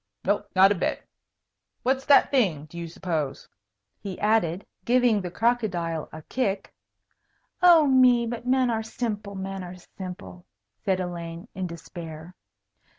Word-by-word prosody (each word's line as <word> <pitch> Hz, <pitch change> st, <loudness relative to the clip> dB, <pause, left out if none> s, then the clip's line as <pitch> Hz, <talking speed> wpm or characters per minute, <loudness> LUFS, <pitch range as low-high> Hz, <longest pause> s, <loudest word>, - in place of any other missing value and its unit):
"No, 200 Hz, +1 st, +1 dB
not 190 Hz, +1 st, +7 dB
a 190 Hz, -4 st, -1 dB
bit. -, -, -2 dB, 0.8 s
What's 265 Hz, +1 st, +1 dB
that 285 Hz, -, +6 dB
thing, 185 Hz, -, +2 dB
do 155 Hz, -, -16 dB
you 170 Hz, 0 st, -5 dB
suppose?" 160 Hz, -4 st, -3 dB, 0.5 s
he 195 Hz, -3 st, -6 dB
added, 205 Hz, -4 st, +1 dB, 0.2 s
giving 240 Hz, -1 st, +3 dB
the 180 Hz, -, -4 dB
crocodile 180 Hz, -7 st, -1 dB
a 155 Hz, 0 st, -9 dB
kick. 205 Hz, -4 st, -2 dB, 0.9 s
"Oh, 345 Hz, -4 st, +7 dB
me, 255 Hz, -3 st, +5 dB
but 240 Hz, +1 st, -5 dB
men 255 Hz, -1 st, +3 dB
are 225 Hz, -1 st, 0 dB
simple, 215 Hz, -3 st, -4 dB
men 195 Hz, 0 st, -5 dB
are 180 Hz, 0 st, -8 dB
simple!" 180 Hz, 0 st, -10 dB, 0.3 s
said 190 Hz, -3 st, 0 dB
Elaine, 170 Hz, +1 st, -5 dB
in 185 Hz, -1 st, -3 dB
despair. 165 Hz, 0 st, -9 dB
195 Hz, 140 wpm, -26 LUFS, 175-235 Hz, 0.9 s, not